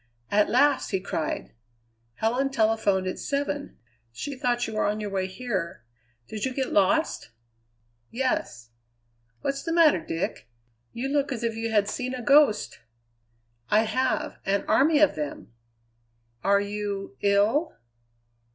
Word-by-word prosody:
"At 210 0 +3
last!" 280 +2 +3
he 190 - 0
cried. 165 -4 -4 0.6
"Helen 245 - 0
telephoned 220 -6 +1
at 185 - -3
seven. 285 0 -3 0.3
She 280 - -5
thought 245 -1 0
you 220 - -6
were 215 - 0
on 210 +1 -1
your 210 -1 -4
way 190 -1 -1
here. 190 - -4 0.4
Did 210 +8 -6
you 260 -1 -2
get 265 -2 -2
lost?" 305 +12 +2 0.8
"Yes." 120 - -2 0.7
"What's 275 0 -2
the 330 - -4
matter, 330 -3 +5
Dick? 165 -6 -4 0.4
You 250 +3 -3
look 280 0 0
as 235 -3 -3
if 230 -1 -1
you 225 0 -3
had 210 -2 +2
seen 255 +3 -3
a 250 - -6
ghost." 280 -5 +4 0.9
"I 210 - +5
have. 255 +4 -1
An 195 +1 0
army 300 +3 +4
of 305 0 +5
them." 150 -6 -6 0.9
"Are 200 +1 +4
you 200 -5 -4
ill?" 205 +10 +2
225 Hz, 140 wpm, -26 LUFS, 200-270 Hz, 0.9 s, matter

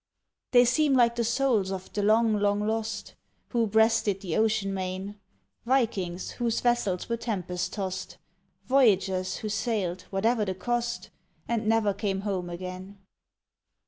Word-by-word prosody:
They 245 -1 +6
seem 280 +3 +3
like 235 -2 +4
the 235 - 0
souls 230 -4 +1
of 190 -1 -6
the 205 - -1
long, 220 +2 +4
long 205 0 +1
lost, 220 -1 -3 0.4
Who 235 -3 +1
breasted 220 -2 +2
the 175 -5 -3
ocean 215 -3 +1
main 190 +2 -4 0.4
Vikings 205 -8 0
whose 235 -2 -1
vessels 240 -7 0
were 235 - -1
tempest 180 -6 -3
tossed, 190 -2 -4 0.5
Voyagers 195 -8 +2
who 215 - -5
sailed, 210 -5 -2
whatever 220 +3 +1
the 190 -2 -2
cost, 240 +4 -2 0.4
And 230 -2 -1
never 220 -2 +3
came 195 -1 -2
home 190 -4 -3
again. 185 +3 -7
210 Hz, 140 wpm, -27 LUFS, 190-235 Hz, 0.5 s, They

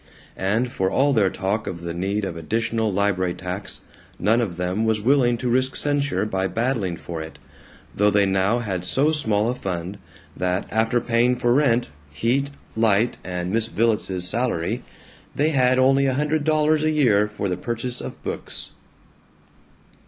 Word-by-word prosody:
And 110 +6 0
for 95 -6 0
all 140 +7 +2
their 105 -6 +3
talk 95 +3 -2
of 85 -2 -5
the 85 0 -4
need 100 +4 -1
of 90 - -4
additional 110 +6 -1
library 95 -2 0
tax 90 +2 -5 0.4
none 110 +5 +2
of 95 -7 -3
them 90 +4 -1
was 110 -1 +1
willing 120 +1 +3
to 125 - -3
risk 130 +2 +1
censure 145 -5 0
by 95 -2 -1
battling 110 -4 -1
for 80 -1 -6
it, 80 0 -9 0.6
though 105 +1 +4
they 100 -1 +3
now 95 +4 +2
had 95 -7 -3
so 140 +11 +2
small 110 -8 +1
a 120 - +1
fund 95 -3 -5 0.4
that, 90 +1 -1
after 115 +3 +2
paying 120 +2 +2
for 120 0 +2
rent, 125 - +2 0.2
heat, 120 - 0 0.3
light, 110 +1 +2
and 90 0 -3
Miss 115 +1 +1
Villets's 105 -5 0
salary, 115 0 -1 0.5
they 150 +2 +2
had 130 -3 +3
only 135 +1 +4
a 130 - +1
hundred 150 +2 0
dollars 155 0 +2
a 155 - +3
year 120 -9 +3
for 105 -1 -4
the 90 - -1
purchase 120 +5 -4
of - - -8
books. - - -5
110 Hz, 165 wpm, -23 LUFS, 95-125 Hz, 0.6 s, though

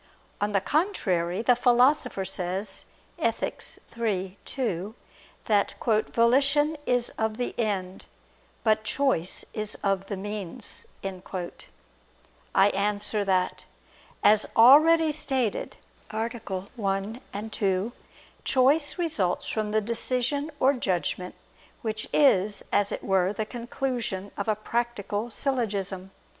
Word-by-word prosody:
On 205 0 +1
the 200 -2 +2
contrary, 195 - 0
The 245 0 +5
Philosopher 245 -3 +3
says 190 +1 -2 0.3
(Ethic. - - -1 0.3
iii, 195 -5 -1
2) 215 -5 -3 0.5
that 205 -2 +2
"volition 270 +7 +3
is 245 -1 +1
of 220 0 0
the 245 - -2
end, 195 -5 -2 0.6
but 215 -1 +3
choice 215 -6 0 0.4
of 195 -1 0
the 200 - -4
means." 205 +2 -6 0.2
I 190 +1 -3
answer 205 +1 0
that, 185 -2 0 0.6
As 215 0 +5
already 310 +7 +7
stated 270 -7 -1 0.3
(A. 220 +1 -1
1, 200 0 -4
ad 210 +2 -5
2), 195 +1 0 0.5
choice 290 +3 +3
results 260 - 0
from 215 -1 -1
the 215 +1 +2
decision 250 +6 -1
or 270 +2 +5
judgment 185 -6 -2 0.5
which 215 -1 -3
is, 210 -8 +3
as 205 0 +3
it - - -4
were, 190 0 +2
the 215 +1 -2
conclusion 235 -4 -3
of 200 - -3
a 215 - +2
practical 230 -1 -2
syllogism. 200 -8 -1
215 Hz, 110 wpm, -27 LUFS, 195-245 Hz, 0.6 s, already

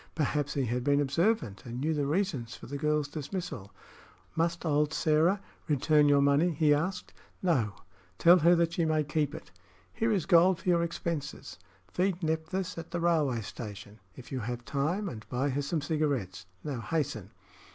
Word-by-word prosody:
Perhaps 145 -2 -1
he 140 -2 +1
had 120 +1 -1
been 145 +1 +3
observant, 145 - 0
and 120 0 -6
knew 155 +4 0
the 145 -2 -1
reason 150 -7 -1
for 115 - -10
the 140 +2 -5
girl's 150 -1 +1
dismissal. 145 - -6 0.6
"Must 170 +1 0
old 150 -1 +2
Sĕra 160 +6 +3 0.3
return 150 0 +3
your 140 -1 +5
money?" 140 +5 +4
he 150 -2 +3
asked. 180 +6 -2 0.3
"No; 125 - +1 0.4
tell 175 +2 +7
her 170 +1 +5
she 170 +1 -2
may 155 -1 +2
keep 150 0 -1
it. - - -10 0.4
Here 225 +1 0
is 195 -7 +1
gold 180 0 +5
for - - -3
your 170 -1 +4
expenses. 165 -3 -4 0.3
Feed 185 -1 -1
Nephthys 160 +3 -2
at 165 - -8
the 170 - -3
railway 155 -8 +1
station, 105 -1 -8 0.2
if 130 - -12
you 130 - -2
have 120 +1 -5
time, 155 - -1
and 110 - -8
buy 130 +3 0
her 140 +2 -1
some 150 +3 -2
cigarettes. 140 - -2 0.2
Now 140 -5 -3
hasten." 140 - -2
150 Hz, 170 wpm, -30 LUFS, 135-170 Hz, 0.6 s, tell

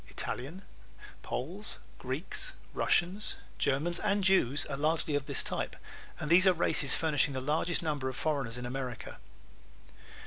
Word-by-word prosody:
Italians, 150 +10 -5 0.6
Poles, 180 +11 -3 0.2
Greeks, 150 - -2 0.2
Russians, 185 +5 +1 0.2
Germans 155 +6 +1
and 205 -1 +1
Jews 150 -8 +3
are 140 - -4
largely 155 +1 0
of 145 -1 -1
this - - +3
type - - -2 0.4
and 155 - -4
these 185 +3 +7
are 185 - +7
the - - -12
races 145 -5 +4
furnishing 150 -3 +1
the - - -1
largest 155 +6 +1
number 145 -4 -1
of 130 - -6
foreigners 135 -7 -1
in 125 - -5
America. 125 -1 -5
150 Hz, 145 wpm, -31 LUFS, 135-175 Hz, 0.6 s, these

